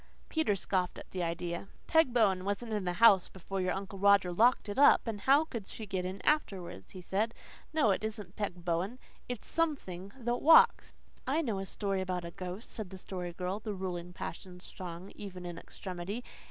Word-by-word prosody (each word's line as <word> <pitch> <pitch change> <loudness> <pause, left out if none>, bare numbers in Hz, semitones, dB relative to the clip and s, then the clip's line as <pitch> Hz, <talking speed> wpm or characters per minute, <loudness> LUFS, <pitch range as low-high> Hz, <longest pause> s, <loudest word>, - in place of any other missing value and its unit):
Peter 315 -11 +1
scoffed 185 -1 0
at - - -11
the 185 - -3
idea. 170 +2 -3 0.2
"Peg 320 -5 +4
Bowen 200 -6 +3
wasn't 205 +3 -2
in 205 -3 -1
the 180 - 0
house 200 -2 +6
before 190 +1 -4
your 185 -1 +1
Uncle 195 0 -6
Roger 200 -2 +5
locked 230 +5 +4
it 205 +5 -3
up, 285 - +7
and 220 -3 -4
how 280 +6 +5
could 230 -10 -6
she 220 - -7
get 190 -3 -2
in 185 +2 -4
afterwards?" 185 - -1
he 185 - -8
said. 215 +6 0 0.4
"No, 305 -9 +3
it 195 - 0
isn't 210 -4 -5
Peg 180 -5 -4
Bowen. 180 +7 -1 0.3
It's 245 -4 -4
SOMETHING 200 - -2
that 240 -1 -1
WALKS." 320 +2 +6 0.3
"I 305 +5 +2
know 220 -8 -1
a 195 - -5
story 195 -1 -2
about 180 -2 -2
a 170 - -6
ghost," 185 +5 -7
said 215 -5 -5
the 190 - -9
Story 180 -1 -5
Girl, 180 +3 -3
the 215 -2 -4
ruling 180 -2 -4
passion 180 +1 -7
strong 180 0 -8
even 185 -3 -8
in 175 -1 -6
extremity. 190 +5 -6
195 Hz, 195 wpm, -32 LUFS, 180-220 Hz, 0.4 s, up